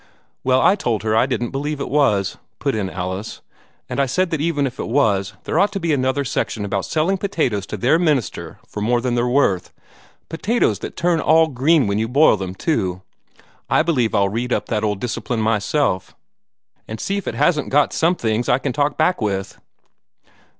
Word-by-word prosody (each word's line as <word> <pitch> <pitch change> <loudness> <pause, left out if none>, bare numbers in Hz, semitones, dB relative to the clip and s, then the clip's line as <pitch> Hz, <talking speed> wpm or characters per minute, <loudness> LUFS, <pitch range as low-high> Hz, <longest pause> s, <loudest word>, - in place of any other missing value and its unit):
"Well, 130 0 +3
I 195 - +5
told 115 - -2
her 110 0 +1
I 115 - +3
didn't 120 -3 -2
believe 145 +2 -3
it 140 - -3
was," 105 -10 +1 0.2
put - - -1
in 105 -4 -2
Alice, 95 +4 -5 0.5
"and - - -4
I 140 - +2
said 185 +7 0
that 160 -3 -1
even 150 -3 0
if 130 -1 -5
it - - -3
was, 105 -7 +1
there 160 - 0
ought 200 +2 +3
to 195 - -2
be 165 -3 0
another 130 +1 0
section 110 -4 -2
about 100 -1 -2
selling 170 +5 0
potatoes 130 - -1
to 105 - -5
their 130 - +3
minister 150 - -1
for 105 - -6
more 120 +3 +2
than 120 0 -1
they're 120 0 +1
worth 120 -9 +1 0.6
potatoes 210 +9 0
that - - -7
turn 170 -1 +1
all 160 +1 +4
green 140 +3 +3
when 100 +1 0
you 110 - 0
boil 140 +2 +5
them, 95 -2 -5
too. 95 - -1 0.7
I - - +3
believe 125 -10 +1
I'll 100 -1 +3
read 120 +5 -3
up - - 0
that 110 -2 -1
old 105 -2 -1
Discipline 120 +1 -3
myself, 110 - 0 0.7
and 110 - -6
see 200 - -2
if 200 - -5
it - - -3
hasn't 160 -4 +1
got 145 +1 +2
some 170 +3 +2
things 115 -3 -1
that - - +3
I - - +4
can 135 -1 -3
talk 145 +1 0
back 180 +1 +1
with." 95 -2 -3
125 Hz, 205 wpm, -20 LUFS, 105-155 Hz, 0.7 s, I